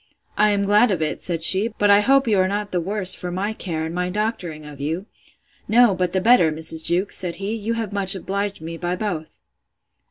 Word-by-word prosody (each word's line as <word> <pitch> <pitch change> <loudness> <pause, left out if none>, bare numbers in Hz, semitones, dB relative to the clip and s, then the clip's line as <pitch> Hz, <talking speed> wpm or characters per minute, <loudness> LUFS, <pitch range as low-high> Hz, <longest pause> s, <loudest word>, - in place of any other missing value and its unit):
—I 210 +1 +3
am 200 -1 +1
glad 210 +4 +4
of 190 -5 -1
it, 155 - -3
said 165 -2 -3
she; 190 +6 +6
but 205 0 +3
I 200 - +7
hope 270 +4 +3
you 210 -4 +2
are 185 - +3
not 205 +1 -3
the 180 - -1
worse 190 +1 +1
for 180 - -4
my 195 +4 -3
care, 160 -6 -4
and 160 - -6
my 180 +1 -2
doctoring 180 -7 -4
of 145 -2 -11
you!—No, 200 +7 -1
but 180 -1 -1
the 190 - 0
better, 200 -6 +4
Mrs. 160 +1 -1
Jewkes, 180 +5 +1
said 175 -2 -4
he; 200 +2 -4
you 225 +1 -3
have 225 -3 -4
much 195 -1 +2
obliged 200 0 -4
me 165 +1 -7
by 175 +1 -3
both. 180 -6 -5
190 Hz, 220 wpm, -21 LUFS, 170-210 Hz, -, I